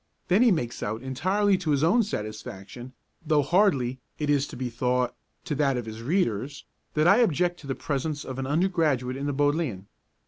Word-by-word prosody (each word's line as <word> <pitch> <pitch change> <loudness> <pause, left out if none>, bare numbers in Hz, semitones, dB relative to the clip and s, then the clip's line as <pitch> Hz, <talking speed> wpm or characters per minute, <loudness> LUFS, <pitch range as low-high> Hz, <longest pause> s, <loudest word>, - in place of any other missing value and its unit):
Then 190 +5 +4
he 250 - +6
makes 120 -10 -1
out 110 +4 -3
entirely 190 +9 +1
to 175 -4 -3
his 145 -1 +2
own 210 +9 +4
satisfaction, 110 - -6 0.3
though 150 -2 +2
hardly, 140 -7 +2 0.2
it 150 -1 0
is 145 -1 +2
to - - -9
be 125 0 -2
thought, 125 +1 0 0.3
to - - -2
that 140 -2 +1
of 120 - -3
his 110 0 -7
readers, 135 - -1 0.3
that 155 +2 +3
I 200 - +7
object 175 - +2
to 140 - -11
the 135 - -2
presence 145 +1 -3
of 130 0 -6
an 135 - -3
undergraduate 150 -6 +1
in 140 +1 -3
the - - 0
Bodleian. 145 - 0
145 Hz, 195 wpm, -26 LUFS, 125-170 Hz, 0.3 s, I